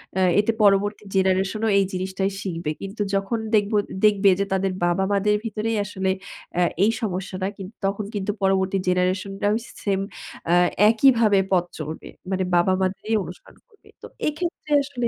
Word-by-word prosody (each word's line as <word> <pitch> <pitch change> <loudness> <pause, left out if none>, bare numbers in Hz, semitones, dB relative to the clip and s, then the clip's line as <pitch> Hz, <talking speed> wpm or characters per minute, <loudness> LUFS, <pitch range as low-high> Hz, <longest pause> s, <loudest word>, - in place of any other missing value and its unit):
অ্যা 190 - +2 0.2
এতে 210 +2 +2
পরবর্তী 205 +1 +3
জেনারেশনও 190 +3 +1
এই 195 - +4
জিনিসটাই 190 +1 -2
শিখবে। 165 -5 -3
কিন্তু 200 +2 -6
যখন 195 +4 -1 0.2
দেখবো 210 0 +2 0.3
দেখবে 205 -1 +5
যে 200 - +1
তাদের 190 0 +1
বাবা-মাদের 195 +3 +2
ভিতরেই 220 +1 -2
আসলে 190 -1 -2 0.5
অ্যা 180 0 +3 0.2
এই 215 - +4
সমস্যাটা 190 -2 -3
কিন্তু 195 +3 -9
তখন 200 +1 -2
কিন্তু 205 +1 -1
পরবর্তী 190 0 +2
জেনারেশনরাও 195 +3 0 0.3
সেম 195 -1 +1 0.5
আ - - +5 0.4
একইভাবে 225 -3 +4
পথ 180 -2 +3
চলবে। 155 +1 -6 0.2
মানে 185 0 0
বাবা 175 +2 +4
মাদেরই 195 +4 -1
অনুসরণ 175 +2 -12
করবে। 425 -4 -26 0.2
তো - - -7 0.2
এক্ষেত্রে 310 0 -4
আসলে 250 -4 -2
195 Hz, 145 wpm, -23 LUFS, 190-210 Hz, 0.5 s, দেখবে